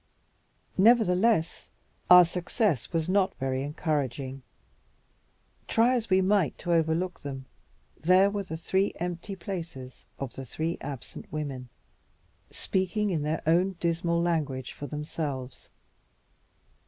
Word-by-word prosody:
Nevertheless, 210 -4 +3 0.4
our 180 0 +10
success 175 - -1
was 165 -2 0
not 190 0 +2
very 130 0 -2
encouraging. 140 -3 -2 1.3
Try 235 +3 +3
as 230 -2 -2
we 190 0 +4
might 190 -6 +2
to 175 - -1
overlook 165 +2 +1
them, 135 -2 -6 0.5
there 185 +4 +5
were 205 0 -2
the 170 -4 -6
three 190 +4 0
empty 175 +3 -4
places 165 -9 -7
of 135 -2 -5
the 135 - -7
three 160 +6 -3
absent 135 -3 -8
women, 140 -5 -4 0.8
speaking 195 +2 -1
in 160 -4 0
their 155 +2 -2
own 175 +4 +3
dismal 170 -1 0
language 150 -7 -1
for 145 - -7
themselves. 145 -4 -5
170 Hz, 115 wpm, -28 LUFS, 145-185 Hz, 1.3 s, our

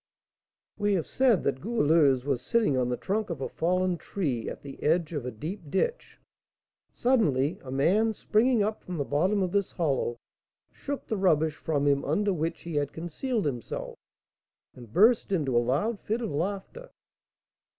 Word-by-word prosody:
We 205 -1 +2
have 170 - -1
said 255 -7 +2
that 130 -1 -1
Goualeuse 155 - +3
was 135 -4 0
sitting 220 - +1
on 125 -1 +1
the 125 - -1
trunk 210 - -2
of 165 -5 -4
a 135 - -2
fallen 180 +1 0
tree, 140 - -3
at - - -8
the 140 -1 -10
edge 165 +2 +1
of 140 -5 -3
a - - -3
deep 155 - -7
ditch. 470 - -2 0.7
Suddenly 160 - +1
a 130 - -9
man, 190 +12 +2
springing 225 +2 +2
up 215 +1 -2
from 180 -2 -5
the 145 - -1
bottom 185 +9 +1
of 180 - -2
this 200 -1 0
hollow, 135 -8 0 0.5
shook 285 -1 -5
the 220 - -2
rubbish 160 -5 +2
from 145 -3 -1
him 140 -1 +2
under 200 +7 +1
which 165 0 -2
he 170 -3 -4
had 145 -1 -1
concealed 195 - -3
himself, 125 -5 -4 0.8
and 120 -4 -13
burst 220 - +4
into 145 -9 0
a 120 - +5
loud 155 - 0
fit 225 +3 -2
of 225 - -3
laughter. 195 - -4
170 Hz, 170 wpm, -28 LUFS, 140-210 Hz, 0.8 s, a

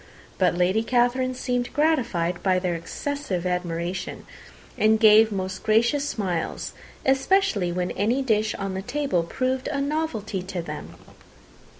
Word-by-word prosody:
But 180 -2 +3
Lady 185 +5 +2
Catherine 250 +2 +1
seemed 245 -1 -2
gratified 235 - +1
by 185 -1 +2
their 180 -1 -1
excessive 185 - -4
admiration, 180 0 -3 0.5
and 220 0 +3
gave 220 0 +7
most 190 -1 -3
gracious 235 +7 +2
smiles, 180 -6 -3 0.3
especially 265 - +2
when 180 +1 -2
any 235 +7 0
dish 220 -3 +1
on 195 -1 -4
the 190 - -3
table 275 -4 0
proved 255 +9 -2
a 280 - -2
novelty 275 - -2
to 185 -2 -5
them. 150 -2 -7
215 Hz, 130 wpm, -25 LUFS, 180-255 Hz, 0.5 s, gave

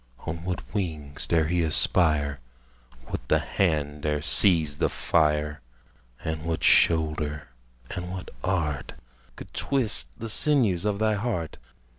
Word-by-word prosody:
On 80 0 -5
what 90 0 -5
wings 75 -8 -4
dare 80 -2 +2
he 85 +2 0
aspire? 75 -3 +2 0.7
What - - -6
the - - +3
hand 75 -5 -1
dare 75 -1 -1
seize 80 -7 +4
the - - +2
fire? 75 -2 0 0.6
And 80 -1 -3
what 80 -1 -3
shoulder 75 -3 +2 0.4
and 90 0 -5
what 90 0 -7
art 80 -6 -2 0.4
Could - - -12
twist 115 - +1
the 115 - -6
sinews 110 - +3
of 105 -1 0
thy 110 +1 +1
heart? 100 -7 -3
80 Hz, 130 wpm, -26 LUFS, 75-95 Hz, 0.7 s, seize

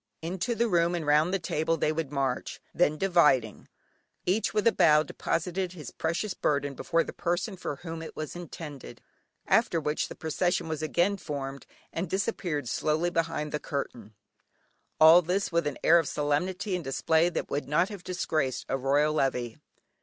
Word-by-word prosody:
Into 185 +8 -2
the 235 +1 +1
room 175 -3 +2
and 165 -3 -3
round 150 +4 +3
the 195 - +2
table 165 -2 -1
they 150 - +1
would 155 -3 -3
march, 135 -3 -2
then 155 -3 +2
dividing, 150 - +2 0.6
each 195 +5 +1
with 210 -1 0
a 230 - +6
bow 155 -6 +5
deposited 180 +3 -2
his 150 -8 -8
precious 170 +5 -2
burden 145 -4 0
before 165 +4 0
the - - -8
person 175 +4 -2
for 175 - -4
whom 165 +2 -7
it 160 - -8
was 155 +1 -5
intended, 160 -5 -8 0.5
after 165 - +3
which 150 0 -1
the - - -9
procession 175 +3 -1
was 160 -1 -3
again 175 +5 +1
formed, 140 -5 -6 0.3
and 170 +1 -3
disappeared 175 - -2
slowly 155 +8 0
behind 165 -3 -1
the 150 - -2
curtain: 120 -8 -5 0.8
all 160 +3 +9
this 180 +4 -1
with 170 -2 +1
an 145 - -3
air 170 +1 +7
of 165 - -1
solemnity 175 +8 -1
and 180 -2 -1
display 160 +5 +2
that - - -4
would 145 - -2
not 170 +6 +2
have 200 -4 -8
disgraced 155 -7 -1
a - - +1
royal 145 +3 +2
levee. 125 -5 -1
165 Hz, 175 wpm, -28 LUFS, 150-180 Hz, 0.8 s, all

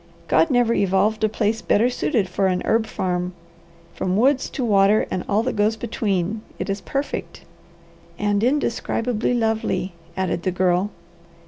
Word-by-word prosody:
God 330 - +3
never 245 -3 +3
evolved 205 +3 +1
a 215 - +4
place 220 +1 0
better 220 +4 +3
suited 245 -4 0
for 190 +2 0
an 180 -1 0
herb 225 0 +2
farm; 180 -3 -2 0.6
from 185 +1 -1
woods 265 +4 +3
to 260 - -3
water 205 0 +4
and 185 - -2
all 210 +2 +2
that 255 - -2
goes 210 +1 +2
between, 215 -3 -2 0.2
it - - -3
is 195 0 -3
perfect." 275 +1 -4 0.8
"And 205 0 0
indescribably 245 -3 0
lovely," 220 -5 -1 0.2
added 190 -2 -1
the 185 - 0
Girl. 185 +1 +1
210 Hz, 150 wpm, -22 LUFS, 190-230 Hz, 0.8 s, a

